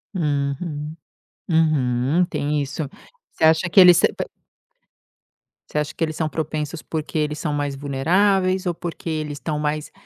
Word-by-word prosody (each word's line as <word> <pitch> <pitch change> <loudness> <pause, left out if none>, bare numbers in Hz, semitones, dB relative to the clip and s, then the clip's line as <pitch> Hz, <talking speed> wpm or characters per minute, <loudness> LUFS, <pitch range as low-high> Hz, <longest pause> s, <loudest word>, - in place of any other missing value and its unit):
Uhum. 150 0 -2 0.5
Uhum. 155 -1 +2
Tem 145 -2 -1
isso. 145 +3 -3 0.5
Você - - -1
acha 160 +2 +4
que 195 - +7
eles 180 -2 +9
são - - +3
p - - -4 1.4
você - - -4
acha 150 - -3
que 165 - -2
eles 155 -1 -2
são 160 - -1
propensos, 155 0 -3
porque 160 0 -4
eles 150 0 -1
são 150 -3 -2
mais 145 -1 -2
vulneráveis 185 +7 +1
ou 175 - 0
porque 170 0 -6
eles 155 -2 -2
estão 150 -1 -3
mais 150 0 -2
155 Hz, 155 wpm, -22 LUFS, 145-170 Hz, 1.4 s, eles